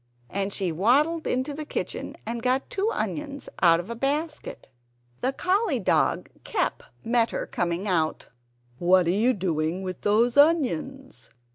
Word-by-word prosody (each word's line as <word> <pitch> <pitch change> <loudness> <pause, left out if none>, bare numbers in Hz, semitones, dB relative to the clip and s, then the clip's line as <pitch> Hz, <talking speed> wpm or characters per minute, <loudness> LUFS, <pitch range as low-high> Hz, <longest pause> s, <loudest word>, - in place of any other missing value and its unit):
And 200 0 -1
she 190 -3 -1
waddled 280 - +2
into 260 +3 -1
the 305 +2 -5
kitchen - - -4
and 230 +1 -4
got 255 +2 0
two 405 +2 0
onions 285 -7 -4
out 165 -2 +6
of 180 +6 -6
a - - -4
basket. 295 +5 -3 0.5
The 260 - 0
collie 370 - +1
dog 195 - +1 0.2
Kep - - -1 0.2
met 235 0 +3
her - - -3
coming 175 +3 -2
out, 160 -4 0 0.5
"What 180 +1 +4
are 170 - +2
you 220 +7 +3
doing 175 -2 -1
with 185 -1 -5
those 230 +5 +2
onions? 270 - +1
235 Hz, 150 wpm, -26 LUFS, 185-285 Hz, 0.5 s, out